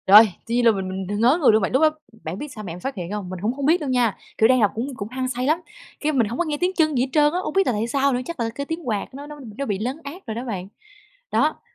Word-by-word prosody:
Rồi. 210 +3 +9 0.2
Tuy 230 - -1
nhiên 245 0 +2
là 230 - +8
mình 190 -3 -3
mình 190 0 -4
đ - - -5
ngớ 245 +7 +5
người 275 - +7
luôn 220 0 +4
bạn. 190 - 0
Lúc 265 - +3
đó 315 - +7 0.3
bạn 160 +4 -4
biết 295 - -5
sao 215 - -8
mẹ 175 -5 -5
em 175 - -8
phát 270 +8 -4
hiện 180 -2 -5
hông? 205 -3 -4
Mình 185 -1 -6
cũng 220 +4 0
hông 275 +1 -3
biết 330 +5 +4
đâu 290 - -2
nha. 245 -4 +2 0.2
Kiểu, 220 - +6
đang 255 0 +5
đọc 205 - +4
cũng 255 +4 -3
cũng 200 -4 -5
hăng 255 +1 -2
say 250 0 -2
lắm, 315 +5 +2 0.4
cái, 310 - +1
mình 245 -7 +2
hổng 235 +4 -5
có 350 - +2
nghe 300 -2 -2
tiếng 360 +4 +1
chân 310 -3 +2
gì 250 - +3
hết 265 - -3
trơn 295 +1 +4
á, 360 - +1
hông - - -3
biết 390 0 +3
là 250 - +2
tại 215 +2 -1
sao 275 +2 +2
nữa, 250 - 0
chắc 340 - -6
là 230 -1 0
cái 280 - -3
tiếng 325 -1 -5
quạt 215 +2 -2
nó 285 +2 -8
nó 295 0 -9 0.2
nó 275 - -2
bị 205 -5 -2
lấn 255 +6 -2
át 315 +7 -9
rồi 220 - -3
đó 240 +3 -4
bạn. 190 -6 -4 0.6
Đó. - - +2
250 Hz, 340 wpm, -23 LUFS, 215-290 Hz, 0.6 s, Rồi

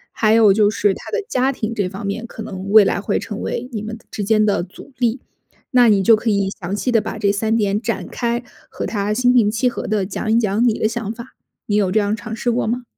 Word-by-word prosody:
还 215 -1 +3
有 215 -3 +6
就 205 0 +3
是 205 -2 +1
他 - - -10
的 450 -1 -1
家 260 - +1
庭 230 -4 -4
这 200 -5 -1
方 195 +2 -7
面 220 +4 -4
可 220 - -8
能 190 -1 -7
未 215 -1 +8
来 200 - 0
会 200 - -1
成 215 -1 -6
为 250 - -3
你 215 - -3
们 220 +1 -6
之 210 - -4
间 215 +1 +3
的 205 -4 +1
阻 185 +9 -13
力。 240 +1 +1 0.6
那 245 -2 +6
你 200 -2 +3
就 225 +3 +6
可 225 +1 -2
以 200 -2 +1
详 180 +3 -3
细 250 +4 -1
地 225 -2 +3
把 215 - -5
这 205 -2 +2
3 220 +2 0
点 205 -1 0
展 210 -6 -3
开， 235 0 -2 0.3
和 - - -5
他 205 -1 -2
心 250 +2 +3
平 230 -5 +4
气 225 +3 0
和 - - -6
地 210 -3 0
讲 215 +3 -3
一 225 - +4
讲 215 0 +1
你 220 - 0
的 215 - +1
想 225 -2 -4
法。 235 +2 -11 0.3
你 205 - -1
有 200 -3 +2
这 215 - +3
样 205 +1 0
尝 220 +2 -7
试 240 +2 -1
过 235 -1 -1
吗？ 245 +3 -2
215 Hz, 275 characters per minute, -19 LUFS, 200-235 Hz, 0.6 s, 未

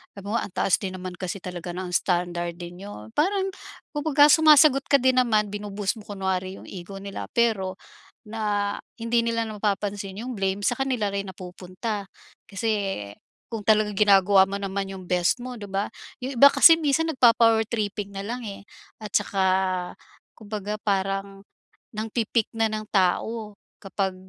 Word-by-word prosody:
sabihin 200 0 -7
mo, 230 - +1
"ang 190 - -6
taas 175 -4 +2
din 190 -2 -5
naman 185 0 -6
kasi 185 +1 -5
talaga 180 -1 -6
ng 180 -1 -5
standard 175 -1 0
din 175 0 -9
nyo." 110 - -10
Parang 385 +3 +1 0.4
kumbaga 295 -1 +4
sumasagot 300 -3 +6
ka 285 - +5
din 260 -1 +3
naman, 215 -4 +1
binu-boost 205 +1 -3
mo - - -18
kunwari 190 -2 -2
yung - - -12
ego 190 +1 -8
nila. 200 -1 -6
Pero 210 -6 +1 0.5
na 210 -2 -1 0.2
hindi 230 +1 +1
nila 230 0 0
na 215 - -7
mapapansin 200 -1 -2
yung 250 +3 -5
blame 195 -1 -1
sa 245 - +2
kanila 255 -5 -1
rin 200 -1 -3
napupunta. 185 +3 -6 0.4
Kasi 220 +3 -2 0.8
kung 225 -3 -6
talagang 210 -1 +3
ginagawa 195 -1 +5
mo 200 +1 -3
naman 195 0 -3
yung 185 -2 -9
best 180 +6 +1
mo, 250 0 -6
'di 205 -4 -9
ba? 195 +1 -1 0.3
Yung 260 +2 -5
iba 280 +4 +8
kasi 330 - +8
minsan 320 0 +1
nagpa-power 230 -6 +4
tripping 210 -2 -3
nalang 210 +5 -5
eh, 200 -1 -8 0.3
at 215 - -6
tsaka 190 -2 +1 0.4
kumbaga 210 -1 -5
parang 195 0 -2 0.4
nangpi-pick 225 +1 -2
na 225 -1 +1
ng 215 0 -4
tao 210 +3 0 0.2
kapag 195 0 -2
205 Hz, 160 wpm, -25 LUFS, 190-230 Hz, 0.8 s, iba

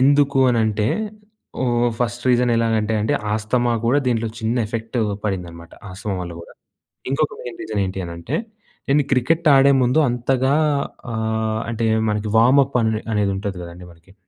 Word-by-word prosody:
ఎందుకు 140 +1 +4
అనంటే 110 -3 +1 0.8
ఆహ్, 120 -1 +2
ఫస్ట్ 120 0 -2
రీజన్ 125 0 +3
ఎలాగంటే 110 -1 +1
అంటే 110 - 0 0.2
ఆస్తమా 120 +3 0
కూడా 135 +5 +3
దీంట్లో 115 -2 0
చిన్న 115 +2 -1
ఎఫెక్టు 115 +2 -3 0.2
పడిందన్నమాట. 85 -4 -5 0.2
ఆస్తమా 100 +1 -4
వల్ల 85 -1 -6
కూడా. 85 - -13 0.6
ఇంకొక 150 +2 0
మెయిన్ 120 - -8
రీజన్ 105 -2 -2
ఏంటి 95 +1 -4
అనంటే 85 - -5 0.5
నేను 145 +1 +4
క్రికెట్ 155 +6 +2
ఆడే 135 +1 +6
ముందు 125 +6 +2
అంతగా 130 +2 +1 0.6
ఆహ్, 110 0 -1
అంటే 115 0 -1 0.2
మనకి 105 0 -2
వార్మ్‌అప్ 135 +3 +4
అని 110 -1 0
అనేది 105 -2 +1
ఉంటది 100 -2 -4
కదండీ 85 +1 -10
మనకి! 85 +3 -21
115 Hz, 145 wpm, -21 LUFS, 105-125 Hz, 0.8 s, ఆడే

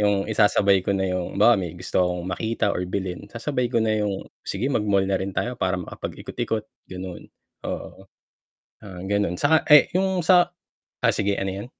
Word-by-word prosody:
yung 100 -1 +2
isasabay 105 -2 +3
ko 100 +2 -1
na 95 - 0
yung, 90 0 -3
halimbawa 105 0 +5
may 90 -1 -5
gusto 90 - -1
akong 90 -1 0
makita 110 +3 -1
or - - -2
bilhin, 95 -2 -4
sasabay 125 0 -2
ko 120 - -2
na 110 -1 +1
yung 100 -2 -2 0.2
sige 125 +9 -2
mag-mall 100 -4 +2
na 95 -1 0
rin 95 0 -3
tayo 125 - -1
para 95 -3 0
makapagikot-ikot, 110 +4 -4 0.2
ganun, 90 -1 -8 0.4
oo. 95 0 -6 0.7
Ah, 95 -3 -9
ganun, 100 -2 0
sa, 160 0 +3
eh 150 -1 +7
yung 190 -1 +1
sa, 175 0 +4 0.5
ah - - +4
sige, 100 -1 0
ano, 95 0 -1
yan? 100 +3 -6
100 Hz, 180 wpm, -24 LUFS, 95-115 Hz, 0.7 s, eh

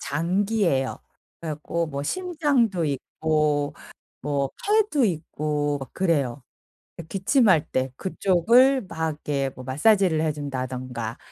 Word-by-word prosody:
장기예요. 175 -2 0 0.4
그래 165 - -4
갖고 165 +3 -3
뭐 140 -2 -4
심장도 280 - 0
있고 150 +1 0 0.5
뭐 140 0 0
팔도 415 - +2
있고 150 -5 -1
막 135 - -9
그래요. 145 -8 0 0.6
예 - - -5
기침할 190 - +2
때 130 0 0
그쪽을 230 +9 +3
막 160 -2 -2
이렇게 145 -2 -2
뭐 130 - -9
마사지를 165 - +3
해 155 -1 +1
준다든가 130 -5 -5
155 Hz, 240 characters per minute, -24 LUFS, 140-195 Hz, 0.6 s, 그쪽을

